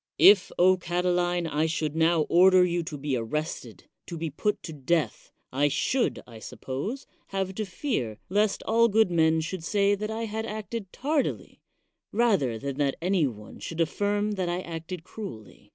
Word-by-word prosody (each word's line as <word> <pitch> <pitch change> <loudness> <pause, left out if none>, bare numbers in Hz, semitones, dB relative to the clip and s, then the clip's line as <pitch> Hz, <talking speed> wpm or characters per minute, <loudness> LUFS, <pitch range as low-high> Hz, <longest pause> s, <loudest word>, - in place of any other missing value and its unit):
If, 195 -2 +7 0.3
Catiline, 175 0 0
I 155 0 0
should 155 -1 -2
now 165 0 +3
order 185 +3 +6
you 175 -1 0
to 155 -3 -5
be 140 -1 -2
arrested, 125 -1 -4 0.2
to 170 - -6
be 160 -1 -3
put 210 +8 -1
to 160 - -6
death, 150 +3 -1 0.2
I 140 +3 +2
should, 245 - 0
I 115 -2 -12
suppose, 140 - -5 0.2
have 190 -1 -2
to 215 +2 -3
fear 180 - -3
lest 205 +1 +1
all 230 +1 +4
good 220 -3 +3
men 160 -1 +3
should 165 +2 -5
say 200 +3 +2
that 210 +1 -3
I 220 +1 -3
had 220 +1 -4
acted 215 -2 -5
tardily, 290 +1 -2 0.5
rather 200 - +2
than 140 +3 -5
that 140 -2 +1
any 180 -3 +2
one 105 -4 -9
should 165 - -6
aflSrm 205 +5 0
that 180 -2 -1
I 175 +1 -1
acted 165 0 -6
cruelly. 170 - -10
175 Hz, 170 wpm, -27 LUFS, 155-205 Hz, 0.5 s, If